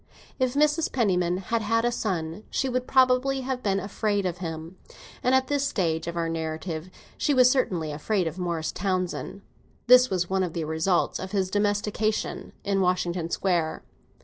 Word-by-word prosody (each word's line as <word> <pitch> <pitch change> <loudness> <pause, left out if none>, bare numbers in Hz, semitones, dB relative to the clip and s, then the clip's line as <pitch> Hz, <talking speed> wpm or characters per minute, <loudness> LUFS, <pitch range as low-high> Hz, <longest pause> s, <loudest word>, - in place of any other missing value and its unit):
If 255 0 +1
Mrs. 300 +2 +2
Penniman 180 -7 +1
had 225 +5 -1
had 230 +2 +1
a 240 - +2
son, 185 -4 -3
she 270 - 0
would 255 0 -2
probably 260 +1 +3
have 260 -1 -3
been 195 -3 +1
afraid 205 0 -1
of 175 -1 -2
him, 165 +1 -6 0.4
and 255 +1 +3
at 260 0 +3
this 280 +1 0
stage 165 -7 -1
of 170 0 -4
our 165 -1 0
narrative 160 +1 -4 0.3
she 290 - +2
was 255 -1 +6
certainly 180 - 0
afraid 180 +6 -1
of 165 +3 -4
Morris 170 -3 -2
Townsend. 185 +1 -3 0.4
This 250 +1 +7
was 180 -2 0
one 190 +1 0
of 180 -3 -2
the 165 -2 -2
results 160 +3 0
of 190 +1 -7
his 190 -2 0
domestication 205 +1 -1
in 195 -1 +1
Washington 180 -2 0
Square. 170 -4 0
190 Hz, 175 wpm, -26 LUFS, 170-240 Hz, 0.4 s, This